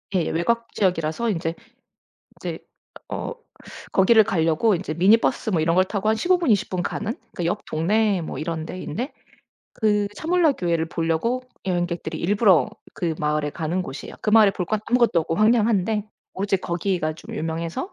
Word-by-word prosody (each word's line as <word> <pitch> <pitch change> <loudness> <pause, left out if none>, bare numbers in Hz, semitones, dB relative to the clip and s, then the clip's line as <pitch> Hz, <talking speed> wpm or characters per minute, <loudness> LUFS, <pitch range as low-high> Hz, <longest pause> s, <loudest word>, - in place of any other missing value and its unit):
예. 170 - +1
외곽 230 +8 -1
지역이라서 180 +3 0
인제 165 -4 -2 0.8
이제 - - -5 0.5
어 - - -4 0.6
거기를 220 +3 +6
가려고 180 +1 +2
이제 170 -3 -4
미니 190 +7 +5
버스 230 -1 -1
뭐 170 -6 +1
이런 165 +1 +2
걸 185 +1 +4
타고 205 +2 -1
한 220 - +3
15 360 +9 +2
분, 335 -7 -1
20 200 - +2
분 180 -2 -2
가는? 220 +1 -3
그러니까 225 -8 -7
옆 170 - -1
동네 195 +4 +1
뭐 - - -6
이런 160 0 -3
데인데 230 - -5 0.6
그 210 -2 +1
차물라 330 - +2
교회를 170 -6 -1
보려고 165 +10 -1 0.2
여행객들이 175 -3 -2
일부러 190 - +3 0.2
그 165 -3 -2
마을에 150 0 0
가는 165 +4 -2
곳이에요. 140 -5 -8
그 210 - 0
마을에 215 -2 +7
볼 180 -3 -3
건 215 +2 -1
아무것도 235 -8 +3
없고 165 - -2
황량한데 215 -2 +2 0.3
오로지 195 +1 0
거기가 170 -3 -1
좀 220 +7 -10
유명해서 165 - -3
185 Hz, 350 characters per minute, -23 LUFS, 165-220 Hz, 0.8 s, 마을에